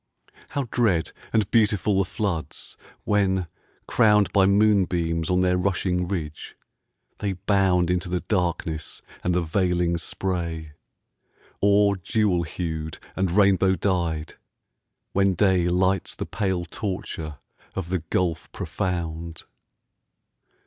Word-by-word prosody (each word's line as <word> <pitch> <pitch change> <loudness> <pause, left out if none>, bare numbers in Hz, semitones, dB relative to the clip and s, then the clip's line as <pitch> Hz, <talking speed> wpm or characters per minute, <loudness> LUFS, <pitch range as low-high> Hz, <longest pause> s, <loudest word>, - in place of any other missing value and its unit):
How 140 - -1
dread 105 -10 +2 0.2
and 110 -3 +1
beautiful 105 -3 +3
the 95 - +2
floods, 95 -5 -4 0.3
when, 95 -3 +2 0.4
crowned 105 -4 +4
By 95 -2 +5
moonbeams 90 -6 +2
on 90 0 +3
their 90 0 +3
rushing 90 -1 0
ridge, 80 -6 -5 0.6
they 100 -2 -1
bound 90 -2 +2
Into 90 0 -1
the 90 0 -1
darkness 85 -4 -2 0.2
and 90 0 +1
the 90 - +2
veiling 85 0 +1
spray; 85 -3 -3 0.9
Or, 100 0 +4
jewel 100 -1 +1
hued 80 -2 -4 0.2
and 95 -1 +1
rainbow 95 0 +4
dyed, 85 -5 -1 0.8
when 100 -1 +3
day 90 -1 +3
Lights 95 +2 +1
the - - -4
pale 95 -3 -1
torture 85 -5 -5 0.4
of 95 -3 -4
the 90 0 0
gulf 85 0 -2
profound! 85 -2 -4
90 Hz, 115 wpm, -25 LUFS, 85-100 Hz, 0.9 s, By